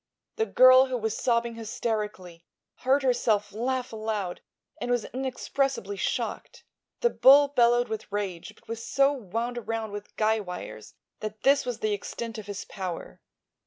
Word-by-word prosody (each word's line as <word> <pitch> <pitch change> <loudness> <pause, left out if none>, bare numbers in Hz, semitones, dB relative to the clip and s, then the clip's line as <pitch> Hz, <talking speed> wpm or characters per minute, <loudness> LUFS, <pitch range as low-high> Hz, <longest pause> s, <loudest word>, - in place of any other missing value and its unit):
The 445 0 +1
girl, 255 +1 +7
who 255 -1 -2
was 220 -2 -2
sobbing 235 -1 +1
hysterically, 210 -6 -4 0.3
heard 270 +2 +2
herself 220 -5 +1
laugh 250 +2 -2
aloud 215 -4 -3 0.4
and - - -4
was 245 -2 +1
inexpressibly 260 -4 -2
shocked. - - -3 0.4
The 475 - +3
bull 280 +2 +7
bellowed 240 -2 +3
with 220 -1 -6
rage 205 -1 -4
but - - -25
was 230 0 -5
so 275 +1 +3
wound 235 0 -3
around 225 -1 -4
with 205 0 -8
guy 220 0 +2
wires 180 - -8 0.2
that 215 0 -6
this 280 -1 +4
was 245 - -3
the 215 -1 +1
extent 225 +2 -5
of 205 - -9
his 205 -1 -5
power. 180 - -6
225 Hz, 155 wpm, -27 LUFS, 205-255 Hz, 0.4 s, girl